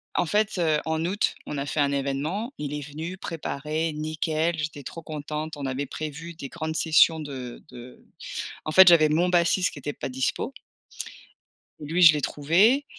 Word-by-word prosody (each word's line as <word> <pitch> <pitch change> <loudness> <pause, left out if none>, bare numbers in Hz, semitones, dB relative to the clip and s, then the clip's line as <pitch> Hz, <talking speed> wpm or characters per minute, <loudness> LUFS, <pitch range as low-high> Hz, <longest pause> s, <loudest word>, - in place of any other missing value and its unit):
en - - +2
fait, 210 +3 +1
heu, 155 -3 +2
en 160 +1 -1
août, 200 +4 0
on 150 - -5
a 140 - -2
fait 145 +2 -3
un 140 -1 +3
évènement, 140 - -2
il 150 -1 -4
est 150 - -3
venu 160 +5 -6
préparer, 160 -2 -3
nickel, 155 +2 -1
j'étais 150 -2 -4
trop 165 - -8
contente, 155 0 -5
on 140 - -5
avait 135 +2 -2
prévu 155 +4 -6
des 140 -4 -8
grandes 160 -2 -4
sessions 160 0 +5
de 130 -5 -7
de 125 +1 -12 0.6
en 155 - -2
fait, 190 +3 +8
j'avais 165 -3 +7
mon 170 +4 +2
bassiste 175 +1 +3
qui 145 - -10
était 145 +1 -4
pas - - -5
dispo. 130 - -2 1.3
Lui, 160 +4 -1
je 165 -3 +10
l'ai 150 - -1
trouvé 185 - +3
155 Hz, 180 wpm, -26 LUFS, 145-170 Hz, 1.3 s, je